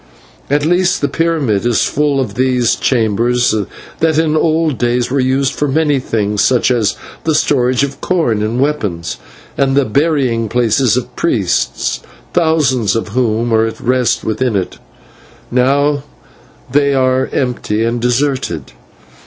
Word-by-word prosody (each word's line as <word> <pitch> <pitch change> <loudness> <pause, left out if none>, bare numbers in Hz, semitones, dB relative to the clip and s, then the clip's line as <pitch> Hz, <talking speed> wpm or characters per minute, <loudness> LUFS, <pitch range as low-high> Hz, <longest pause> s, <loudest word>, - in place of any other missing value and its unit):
At 145 +1 +1
least 175 +2 +1
the 145 - +2
pyramid 150 -13 0
is 120 -4 +2
full 145 -1 0
of 120 -7 -2
these 125 -1 +1
chambers, 120 0 +1 0.5
that 160 -1 +2
in 160 -1 +2
old 155 -3 +1
days 120 0 0
were 140 - +1
used 130 +1 +1
for 145 - -1
many 145 0 +1
things, 105 -4 -1
such 130 0 +2
as 115 -4 +1 0.3
the 160 -1 +1
storage 130 -3 +2
of 140 0 -4
corn 155 -13 0
and 110 +3 -1
weapons, 105 - -2 0.4
and 135 0 +2
the 140 - +3
burying 125 -3 0
places 120 0 +2
of 125 0 -5
priests, 100 - -1 0.3
thousands 150 - +2
of 115 -1 -2
whom 115 0 0
are 110 0 +3
at 115 - -7
rest 125 0 0
within 110 +1 -1
it. 95 -2 -3 0.7
Now 140 +3 +2 0.7
they 140 0 +2
are 130 0 +2
empty 120 -4 -1
and 115 +1 -1
deserted." 125 - -1
130 Hz, 145 wpm, -15 LUFS, 115-145 Hz, 0.7 s, the